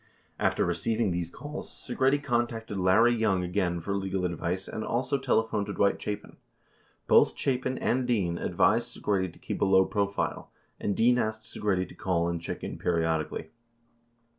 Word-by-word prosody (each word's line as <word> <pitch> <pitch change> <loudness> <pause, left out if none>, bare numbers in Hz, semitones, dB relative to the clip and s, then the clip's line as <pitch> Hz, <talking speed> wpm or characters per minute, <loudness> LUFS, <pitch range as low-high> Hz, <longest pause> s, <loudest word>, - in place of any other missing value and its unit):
After - - +2
receiving 100 +5 0
these 85 -1 -2
calls, 145 - -7
Segretti 130 +3 +1
contacted 115 -4 -1
Larry 110 +6 +5
Young 105 -6 +1
again 90 -1 0
for 100 +4 -3
legal 95 -1 -1
advice 90 +2 -2
and 110 - -4
also 130 +5 0
telephoned 110 -5 +1
Dwight 100 -1 +1
Chapin. 105 0 -5 0.7
Both - - +5
Chapin 130 -1 0
and 125 0 0
Dean 95 -8 0
advised 110 +7 +2
Segretti 95 -3 0
to - - -18
keep - - -5
a - - +5
low 95 -1 +5
profile, 100 0 -2 0.3
and 100 - -1
Dean 120 +2 +4
asked 110 -1 -2
Segretti 100 -4 -1
to - - -13
call 85 -3 0
and 85 -1 -2
check - - -5
in - - -5
periodically. 80 -2 -1
100 Hz, 160 wpm, -28 LUFS, 90-115 Hz, 0.7 s, Larry